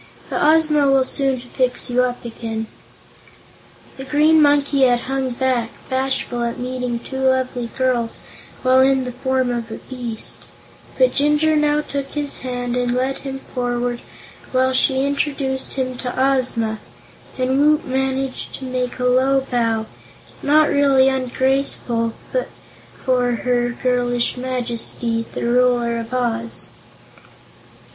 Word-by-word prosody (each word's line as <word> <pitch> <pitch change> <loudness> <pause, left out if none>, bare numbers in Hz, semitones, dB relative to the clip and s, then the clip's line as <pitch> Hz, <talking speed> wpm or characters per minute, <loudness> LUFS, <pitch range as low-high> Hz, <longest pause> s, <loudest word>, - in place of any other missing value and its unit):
But - - -1
Ozma 305 -1 +4
will 270 -1 +4
soon 270 -1 0
fix 250 0 -1
you 250 0 +2
up 245 -1 -2
again." 225 -1 -4 1.3
The 265 - -6
Green 300 +4 +4
Monkey 285 -1 +3
had 245 -2 +4
hung 265 0 -2
back, 245 -2 0 0.2
bashful 260 -2 -1
at 235 0 -2
meeting 250 -1 -3
two 265 +3 -6
lovely 260 -2 0
girls 250 -3 0 0.5
while 260 0 +5
in 265 0 +3
the 250 - -4
form 260 0 0
of 235 -1 -3
a - - -5
beast; 240 -4 -5 0.5
but - - +4
Jinjur 300 +2 +2
now 300 0 +2
took 280 -2 -4
his 290 -1 -2
hand 245 -1 -3
and 245 0 0
led 260 +2 -1
him 270 -1 -5
forward 245 -2 -3 0.5
while 260 0 +2
she 265 +1 +2
introduced 280 -2 -1
him 255 -1 -2
to 250 0 -4
Ozma, 250 -5 +1 0.6
and 260 +1 +1
Woot 300 +1 +3
managed 265 0 -2
to 265 - -7
make 255 -1 -2
a 250 - -2
low 260 +2 +3
bow, 230 -2 +1 0.6
not 305 +1 +4
really 275 -2 +4
ungraceful, 260 -3 0 0.2
before 255 - -2
her 245 0 0
girlish 245 -1 0
Majesty, 240 -2 -2
the - - -3
Ruler 240 -1 +2
of 230 +1 -7
Oz. 230 -2 -2
255 Hz, 135 wpm, -20 LUFS, 245-270 Hz, 1.3 s, while